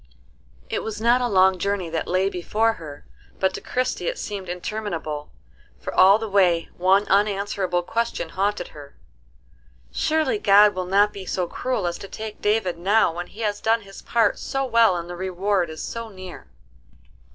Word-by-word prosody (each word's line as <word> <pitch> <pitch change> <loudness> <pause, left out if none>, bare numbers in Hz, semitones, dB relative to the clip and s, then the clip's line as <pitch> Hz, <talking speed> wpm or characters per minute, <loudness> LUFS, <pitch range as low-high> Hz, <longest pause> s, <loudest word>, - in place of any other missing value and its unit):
It - - -2
was 215 -1 -5
not 240 +3 +3
a 245 - +1
long 190 -3 +4
journey 200 -1 -1
that 165 - -2
lay 185 +2 +1
before 215 +5 0
her; 145 -3 -10 0.3
but 190 0 +1
to - - -6
Christie 255 0 -2
it - - -2
seemed 195 -3 -5
interminable, 175 -5 -4 0.5
for - - -6
all 195 +2 +7
the 225 0 -5
way 180 -5 +2
one 190 +3 +3
unanswerable 195 -3 +1
question 230 -4 -2
haunted 195 0 -1
her, 145 -1 -13 1.0
"Surely 315 +8 0
God 205 - +6
will 185 -1 -4
not 205 +2 +3
be 190 -2 -8
so 180 - -1
cruel 250 +2 -2
as 175 0 -2
to 195 - -8
take 215 +1 -8
David 205 -5 0
now 200 0 +3
when 175 +1 -5
he 220 - -11
has 205 -2 -1
done 225 +1 +2
his 195 -1 -12
part 235 -1 +1
so 270 0 -2
well 230 -6 +4
and 170 0 -5
the 175 - -6
reward 185 0 -1
is 155 0 -7
so 230 -1 -5
near." 185 - -10
195 Hz, 175 wpm, -23 LUFS, 180-220 Hz, 1.0 s, all